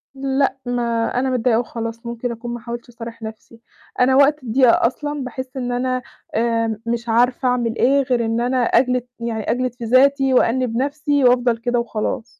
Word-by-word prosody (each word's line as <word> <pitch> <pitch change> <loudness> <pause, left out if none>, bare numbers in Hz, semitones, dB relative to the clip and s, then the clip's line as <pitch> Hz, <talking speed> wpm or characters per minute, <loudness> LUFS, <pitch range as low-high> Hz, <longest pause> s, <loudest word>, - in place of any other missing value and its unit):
لأ، 270 0 0
ما 245 0 -1 0.4
أنا 265 +1 0
متضايقة 245 -2 +2
وخلاص، 230 -1 -5
ممكن 235 +1 -4
أكون 235 +1 -6
ما 240 - -5
حاولتش 235 +1 -7
أصارح 230 -1 -9
نَفْسي. 220 +1 -10 0.4
أنا 260 +1 +4
وقت 285 +1 +4
الضيقة 240 0 +4
أصلًا 290 +2 -4
باحس 260 +1 -7
إن 245 -1 -2
أنا 255 +1 -1 0.3
آمم، 230 -1 0
مش 235 0 -3
عارفة 245 +3 +2
أعمل 240 -2 0
إيه 275 +3 +3
غير 250 -3 0
إن 225 +1 0
أنا 250 +2 0
أجلد 250 +1 +2
يعني 225 -2 -2
أجلد 250 0 -1
في 245 - -9
ذاتي، 270 +2 +4
وأنّب 250 -1 +2
نَفْسي، 285 +1 0
وأفضل 245 -1 +3
كده 240 +1 -1
وخلاص. 225 -1 -3
245 Hz, 175 wpm, -20 LUFS, 230-260 Hz, 0.4 s, أنا